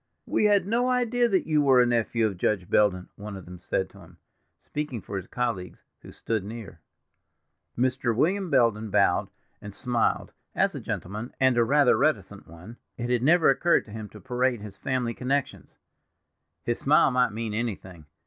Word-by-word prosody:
"We - - +1
had 205 -3 +4
no 235 +5 +1
idea 245 -1 +2
that 190 -3 +1
you 155 -2 +2
were 135 -3 +5
a 125 - +6
nephew 115 -1 +1
of 100 -5 -3
Judge 95 -3 0
Belden," 90 -3 +2
one 100 -1 -7
of 95 - -11
them 90 0 -11
said 95 +1 -2
to 100 - -16
him, 85 -1 -16 0.4
speaking 150 -5 -5
for 100 - -8
his 95 -1 -5
colleagues, 115 -8 -4 0.2
who - - -12
stood 110 -3 -3
near. 105 -5 -9 1.0
Mr. 125 -1 0
William 185 - +1
Belden 110 -5 +2
bowed, - - +2 0.3
and 100 -2 -9
smiled; 120 -1 -1 0.2
as - - +2
a - - -5
gentleman, 105 +7 -5
and 130 -1 +4
a 120 - +4
rather 140 +2 +4
reticent - - -1
one, 90 +9 -12 0.2
it 120 0 -3
had 120 -2 +2
never 160 +2 +5
occurred 170 +5 +2
to 110 - -14
him 110 -1 -7
to - - -13
parade 125 -2 -1
his 105 -2 -9
family 125 +2 -2
connections. 135 +3 -3 0.9
His 120 - -2
smile 145 0 +4
might 125 -1 +3
mean 110 0 -4
anything. 95 -8 -5
120 Hz, 180 wpm, -26 LUFS, 105-135 Hz, 1.0 s, a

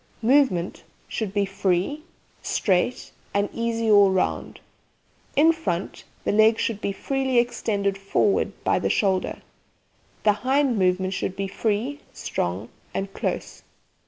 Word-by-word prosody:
MOVEMENT 240 -9 +2 0.2
Should 215 -4 -3
be 200 0 +1
free, 195 - 0 0.4
straight, 205 +6 0 0.2
and 200 0 +2
easy 230 -1 -1
all 205 -1 +7
round. 190 -1 -1 0.8
In 320 +3 +6
front, 195 - -4 0.2
the - - +1
leg 220 +2 +5
should 215 -3 -2
be 200 - -1
freely 265 +4 -1
extended 205 -5 0
forward 195 0 +1
by - - +2
the - - 0
shoulder. 190 -3 0 0.8
The 210 - +5
hind 265 -3 +2
movement 185 0 +1
should 185 0 -3
be 195 0 -2
free, 225 +8 -1
strong, 90 +6 -3 0.3
and 195 0 -3
close. - - -3
205 Hz, 130 wpm, -24 LUFS, 190-240 Hz, 0.8 s, all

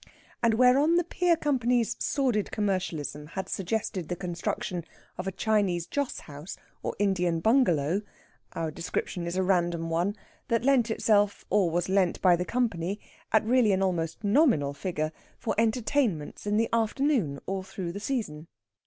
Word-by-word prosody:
And 230 -2 +3
whereon 260 +7 +5
the 350 - +3
pier 345 0 +1
company's 250 -6 +1
sordid 250 -7 0
commercialism 175 -8 -2
had 190 - -2
suggested 190 -3 -2
the 175 - -1
construction 175 0 -3 0.3
of 180 - -5
a - - 0
Chinese 195 -5 +1
joss 285 +4 -3
house, 145 +4 -9 0.2
or - - -3
Indian 180 -4 +1
bungalow 180 - +3 0.5
our 160 -1 -2
description 170 +1 -3
is 170 - -3
a 190 - +1
random 175 -3 +1
one 175 +5 0 0.3
that 230 -1 +1
lent 260 -4 +4
itself, 205 -2 +2
or 195 -3 +3
was 175 +1 0
lent 190 -2 +2
by 180 -2 +5
the 180 +1 -2
company, 205 -6 -1 0.3
at 220 -1 +3
really 235 -3 +4
an 190 0 +1
almost 170 0 -1
nominal 205 - +3
figure, 155 0 -3 0.3
for - - -2
entertainments 225 - 0
in 205 +1 +2
the 225 +1 +2
afternoon 230 - +1
all 195 0 -2
through 185 -2 -5
the 200 - -6
season. 205 - -3
195 Hz, 155 wpm, -28 LUFS, 170-230 Hz, 0.5 s, whereon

